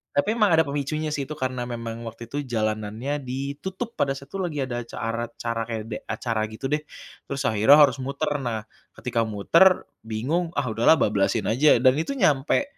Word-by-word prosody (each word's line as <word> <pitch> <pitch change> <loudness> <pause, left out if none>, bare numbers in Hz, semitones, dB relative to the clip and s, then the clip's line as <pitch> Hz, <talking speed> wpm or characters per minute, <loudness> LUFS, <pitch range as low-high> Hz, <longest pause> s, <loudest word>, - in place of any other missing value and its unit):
Tapi 145 +9 +2
memang 210 -6 +3
ada 160 - +5
pemicunya 150 +2 -2
sih 140 -2 -2
itu, 155 - -6
karena 130 -3 -3
memang 115 -1 -5
waktu 115 +1 -9
itu 145 - -2
jalanannya 110 +4 -2
ditutup 140 - -5
pada 140 -1 +1
saat 140 0 -12
itu 195 - -5
lagi 155 -7 -2
ada 120 -2 -3
acara 115 0 -4
acara 115 0 -4
kayak 115 -2 -3
ada 105 - -2
acara 115 -3 -2
gitu 110 +5 -6
deh, 150 - +2 0.5
terus 140 0 -3
akhirnya 110 +4 +6
harus 140 -4 +5
muter. 140 +4 -2
Nah 115 -5 -3 0.3
ketika 115 -2 -1
muter 165 - +4 0.2
bingung 155 +11 -1
ah 130 -5 -1
udahlah 115 +8 +5
bablasin 105 -8 +1
aja 145 +6 +5
dan 130 - +7
itu 220 +13 -2
nyampe 150 - +2
130 Hz, 185 wpm, -25 LUFS, 115-150 Hz, 0.5 s, dan